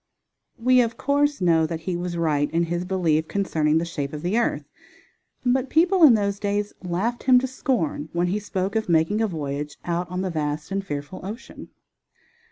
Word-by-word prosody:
We, 255 +1 +4
of 230 -1 -2
course, 285 -2 +1
know 165 -3 +3
that 160 0 -5
he 180 +1 -3
was 175 0 -3
right 150 -3 +1
in 165 +1 +1
his 175 +1 -2
belief 165 -4 +1
concerning 160 -6 +1
the 165 - 0
shape 145 -4 -4
of 150 +1 -6
the 180 +4 0
earth, 235 - 0 0.8
but 255 +1 +1
people 360 +4 +3
in 285 -8 +9
those 200 -1 -1
days 205 0 -1
laughed 190 +7 -2
him 255 -1 +7
to 250 - +2
scorn 240 - -2
when 170 +1 0
he 190 +4 0
spoke 195 -1 -3
of 220 -3 -1
making 165 +6 +2
a 225 - +2
voyage 150 -4 -4
out 175 +1 -2
on 180 +1 -3
the 190 -1 -2
vast 150 +1 -3
and 195 0 -1
fearful 145 0 -6
ocean. 215 +6 -8
180 Hz, 190 wpm, -24 LUFS, 160-220 Hz, 0.8 s, in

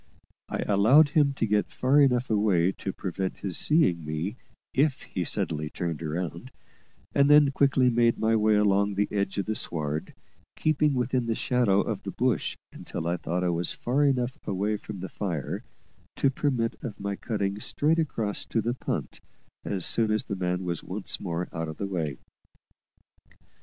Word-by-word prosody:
I - - -2
allowed 115 +10 +6
him 145 -2 +3
to 135 - 0
get 105 -1 +1
far 135 +3 +3
enough 125 -3 +2
away 100 -4 +3
to 95 - -5
prevent 95 0 -4
his 95 -4 -3
seeing 95 - +2
me 80 +8 -3 0.4
if 140 0 +1
he - - -3
suddenly 75 -1 -1
turned 85 -1 -4
round, 85 +7 -4 0.6
and 140 0 +4
then 150 -1 +7
quickly 135 -2 +3
made 120 0 +3
my 110 0 +2
way 110 -1 +3
along 100 -1 +2
the 105 +1 +1
edge 100 -1 -1
of 100 - 0
the 110 - -1
sward, 75 -6 -2 0.4
keeping 150 -2 +2
within 125 -1 0
the 115 - 0
shadow 115 -6 +2
of - - -3
the - - -6
bush - - 0 0.2
until - - -6
I 85 +1 +1
thought 90 +2 -2
I 90 - +1
was 85 0 0
far 135 +4 0
enough 130 -3 +1
away 100 +1 0
from 105 -2 -7
the 95 - -4
fire 85 -7 -4 0.5
to 135 - +2
permit 130 -5 -1
of 115 -6 -6
my 100 0 -2
cutting 100 -2 -2
straight 155 +8 +1
across 115 -10 -1
to 115 - 0
the 115 +2 0
punt 125 - -4 0.4
as 95 -4 -1
soon 115 -2 +2
as 110 0 +1
the 100 - -4
man 90 0 -1
was 85 -1 -3
once 95 +2 -3
more 90 -1 -3
out 80 -1 -3
of 80 - -7
the 100 - -3
way. 80 -8 -3
105 Hz, 180 wpm, -27 LUFS, 90-125 Hz, 0.6 s, then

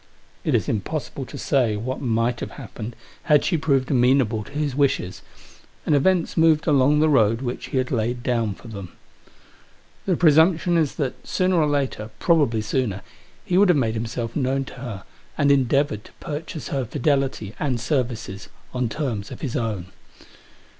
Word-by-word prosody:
It - - +1
is - - +1
impossible 135 +4 -3
to - - -8
say 125 -6 +1
what 130 +5 -4
might 115 -1 0
have - - -4
happened 115 +1 -7 0.3
had 150 -1 +4
she 180 - +1
proved 140 -4 +1
amenable 125 -4 +3
to 140 - -14
his 145 -2 -2
wishes; 135 -10 0 0.6
and - - +2
events 170 +4 +2
moved 160 -1 +4
along 145 0 +4
the 155 - +4
road 115 -5 +3
which 125 -1 -4
he - - -3
had 130 -1 0
laid 120 0 -1
down 115 -5 0
for - - -14
them. 100 -5 -8 1.1
The 185 - +3
presumption 165 +2 +4
is 160 -4 +1
that, 140 -5 -4
sooner 185 -1 +1
or 150 - +3
later 135 -7 -1
— - - -31
probably 145 -10 +3
sooner— 110 -3 -1 0.4
he 185 -3 +2
would 200 -1 +5
have 175 - +5
made 115 -5 +1
himself 115 +1 -4
known 135 -1 0
to - - -10
her, 120 -7 -7 0.3
and 140 0 +4
endeavoured 135 -4 +2
to - - -16
purchase 155 0 -6
her 135 -2 -1
fidelity, 135 -4 -1
and 130 -5 0
services, 120 -7 -2 0.2
on 125 -2 -1
terms 115 -7 -3
of - - -9
his 135 -3 -3
own. 105 -8 -3
130 Hz, 175 wpm, -23 LUFS, 115-150 Hz, 1.1 s, would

